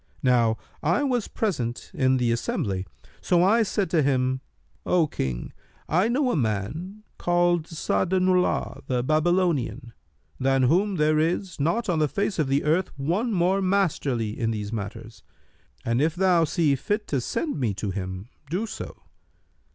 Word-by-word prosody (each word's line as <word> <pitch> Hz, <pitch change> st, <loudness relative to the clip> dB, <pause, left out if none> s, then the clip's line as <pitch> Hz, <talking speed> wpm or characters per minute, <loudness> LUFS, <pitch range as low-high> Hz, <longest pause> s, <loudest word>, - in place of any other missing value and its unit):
Now 120 Hz, -3 st, +3 dB, 0.2 s
I 175 Hz, -, +2 dB
was 250 Hz, -5 st, 0 dB
present 130 Hz, -, -3 dB
in 130 Hz, -1 st, +2 dB
the 120 Hz, -2 st, +1 dB
assembly; 100 Hz, -5 st, -2 dB, 0.3 s
so 175 Hz, -1 st, +3 dB
I 220 Hz, +5 st, +4 dB
said 205 Hz, -2 st, 0 dB
to 165 Hz, -, +3 dB
him, 130 Hz, -2 st, +1 dB, 0.4 s
'O 175 Hz, -3 st, +3 dB
King, 65 Hz, -, -4 dB, 0.3 s
I 180 Hz, +6 st, +2 dB
know 255 Hz, +2 st, +1 dB
a -, -, 0 dB
man 150 Hz, -, -2 dB, 0.2 s
called 175 Hz, -2 st, +2 dB
Sa'adu'llбh 180 Hz, -3 st, 0 dB
the 125 Hz, -2 st, 0 dB
Babylonian, 155 Hz, -5 st, +1 dB, 0.5 s
than 135 Hz, 0 st, +2 dB
whom 185 Hz, +10 st, +3 dB
there 155 Hz, -1 st, +2 dB
is 170 Hz, +3 st, -1 dB
not 170 Hz, +11 st, 0 dB
on 170 Hz, -4 st, +1 dB
the 155 Hz, -, +3 dB
face 195 Hz, -, -2 dB
of 150 Hz, -, +2 dB
the 135 Hz, +1 st, +1 dB
earth 165 Hz, +5 st, +1 dB
one 180 Hz, -, 0 dB
more 190 Hz, 0 st, +2 dB
masterly 150 Hz, -, 0 dB
in 115 Hz, -, 0 dB
these 105 Hz, -1 st, -3 dB
matters, 110 Hz, +1 st, -6 dB, 0.6 s
and 115 Hz, +3 st, +1 dB
if 160 Hz, +2 st, +1 dB
thou 180 Hz, -3 st, +3 dB
see 150 Hz, -2 st, +2 dB
fit 210 Hz, -, -2 dB
to 140 Hz, -3 st, 0 dB
send 295 Hz, -, -2 dB
me 115 Hz, -7 st, 0 dB
to 100 Hz, 0 st, -3 dB
him, 95 Hz, +1 st, -5 dB, 0.2 s
do 185 Hz, +8 st, -1 dB
so.' 220 Hz, -, -8 dB
155 Hz, 155 wpm, -25 LUFS, 125-185 Hz, 0.6 s, I